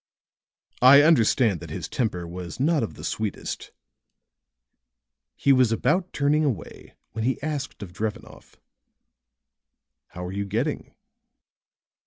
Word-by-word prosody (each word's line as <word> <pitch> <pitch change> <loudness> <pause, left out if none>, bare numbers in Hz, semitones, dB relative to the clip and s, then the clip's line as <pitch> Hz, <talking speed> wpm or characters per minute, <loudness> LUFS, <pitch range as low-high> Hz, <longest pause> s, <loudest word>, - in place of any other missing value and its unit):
"I 140 +3 +8
understand 120 - +3
that - - -10
his - - -5
temper 90 -8 -2
was 90 +3 -7
not 155 +3 +2
of 115 - -4
the - - -11
sweetest." 110 -2 -4 1.6
He 140 - +3
was 130 -3 +4
about 175 +10 +1
turning 150 +2 +1
away 115 - -4 0.2
when 110 +1 -4
he 130 +3 0
asked 145 -7 -4
of 90 -3 -10
Drevenoff: 105 +2 -6 1.5
"How 90 +1 -8
are 90 - -5
you 100 +1 -3
getting?" 115 +10 -3
115 Hz, 120 wpm, -25 LUFS, 100-145 Hz, 1.6 s, I